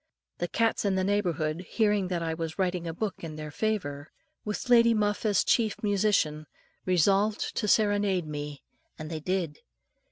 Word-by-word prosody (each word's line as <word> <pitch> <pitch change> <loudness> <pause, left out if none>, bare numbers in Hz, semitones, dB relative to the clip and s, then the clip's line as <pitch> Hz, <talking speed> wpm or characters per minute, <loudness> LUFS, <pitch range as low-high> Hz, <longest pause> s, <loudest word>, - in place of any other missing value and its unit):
The 175 - -1
cats 225 +6 +1
in 200 -2 +1
the 190 - +1
neighbourhood, 175 -5 0
hearing 210 -4 +2
that 175 -2 -2
I 165 -1 -1
was 160 -1 -5
writing 180 -2 -1
a - - -2
book 195 +4 -4
in 160 -2 -6
their 155 -1 -7
favour, 155 -9 -2 0.3
with 210 +3 -4
Lady 235 -1 +6
Muff 210 +1 0
as 205 -1 +3
chief 220 -4 +2
musician, 195 -7 +1 0.4
resolved 195 +4 +2
to 210 - 0
serenade 205 -4 +2
me; 145 -1 -6 0.3
and 155 +1 -7
they 160 - -3
did. 170 -2 -2
185 Hz, 165 wpm, -28 LUFS, 160-210 Hz, 0.4 s, Lady